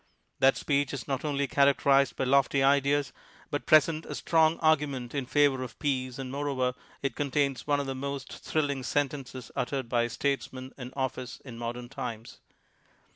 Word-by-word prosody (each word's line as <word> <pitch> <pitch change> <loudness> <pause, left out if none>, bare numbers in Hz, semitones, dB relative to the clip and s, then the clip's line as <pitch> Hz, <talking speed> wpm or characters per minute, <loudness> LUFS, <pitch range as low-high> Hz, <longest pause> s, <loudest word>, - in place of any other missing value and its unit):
That 135 0 +5
speech 140 -2 0
is 135 - -7
not 135 -2 -2
only 140 -2 0
characterized 140 -1 +3
by - - -1
lofty 135 +1 +3
ideas, 140 0 +3 0.4
but 145 - -3
presents 155 +1 +4
a - - -5
strong 160 0 +3
argument 145 -6 +1
in 140 -3 -2
favor 145 -2 +3
of 130 - -7
peace 130 -3 -1
and 130 -1 -5
moreover 135 -3 -1 0.3
it 135 -4 -1
contains 140 -2 0
one 145 -1 +2
of 140 - -2
the 135 - -3
most 140 0 -5
thrill 150 -2 -1
ing 135 -2 -3
sentences 135 -1 -3
uttered 130 -1 -2
by 120 -1 +2
a 120 - 0
statesman 130 0 -3
in 125 -2 -8
office 130 -2 -3
in 125 -4 -8
modern 120 +1 -4
times. 120 -4 -7
135 Hz, 175 wpm, -29 LUFS, 130-145 Hz, 0.4 s, That